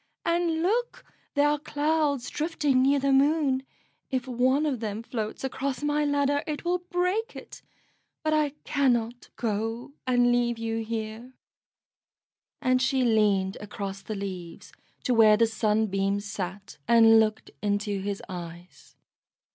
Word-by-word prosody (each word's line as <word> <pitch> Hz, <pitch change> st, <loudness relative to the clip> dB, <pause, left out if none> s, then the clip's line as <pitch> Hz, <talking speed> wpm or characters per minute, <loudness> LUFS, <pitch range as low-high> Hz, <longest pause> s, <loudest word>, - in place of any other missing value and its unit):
And 335 Hz, -1 st, +1 dB
look, 475 Hz, +6 st, -1 dB, 0.3 s
there 285 Hz, +1 st, +4 dB
are 295 Hz, 0 st, +1 dB
clouds 295 Hz, -3 st, 0 dB
drifting 295 Hz, -4 st, +1 dB
near 275 Hz, +2 st, +4 dB
the 275 Hz, 0 st, +1 dB
Moon; 275 Hz, -1 st, +3 dB, 0.5 s
if 260 Hz, -1 st, -2 dB
one 260 Hz, +4 st, +2 dB
of 275 Hz, -5 st, -1 dB
them 215 Hz, 0 st, -4 dB
floats 220 Hz, -1 st, -5 dB
across 265 Hz, +1 st, -3 dB
my 295 Hz, 0 st, +1 dB
ladder 285 Hz, 0 st, +1 dB
it 300 Hz, +1 st, -4 dB
will 355 Hz, +1 st, +1 dB
break 360 Hz, +5 st, -1 dB
it. -, -, -10 dB, 0.6 s
But 310 Hz, 0 st, +1 dB
I 300 Hz, -2 st, +1 dB
cannot 245 Hz, -4 st, 0 dB
go 225 Hz, +3 st, -3 dB
and 245 Hz, -1 st, +4 dB
leave 240 Hz, -1 st, +1 dB
you 225 Hz, 0 st, -2 dB
here;" 225 Hz, +3 st, -5 dB, 1.3 s
and 255 Hz, 0 st, +3 dB
she 260 Hz, 0 st, +2 dB
leaned 205 Hz, -4 st, +2 dB
across 200 Hz, -1 st, -6 dB
the 215 Hz, -, -5 dB
leaves 185 Hz, -4 st, -7 dB, 0.3 s
to 250 Hz, -, +1 dB
where 215 Hz, -2 st, +6 dB
the 230 Hz, -, +5 dB
Sunbeam 210 Hz, -3 st, 0 dB
sat, 200 Hz, 0 st, -6 dB
and 225 Hz, -1 st, +7 dB
looked 220 Hz, 0 st, 0 dB
into 205 Hz, -1 st, -1 dB
his 200 Hz, 0 st, -4 dB
eyes. 175 Hz, -1 st, -10 dB
245 Hz, 140 wpm, -27 LUFS, 215-285 Hz, 1.3 s, and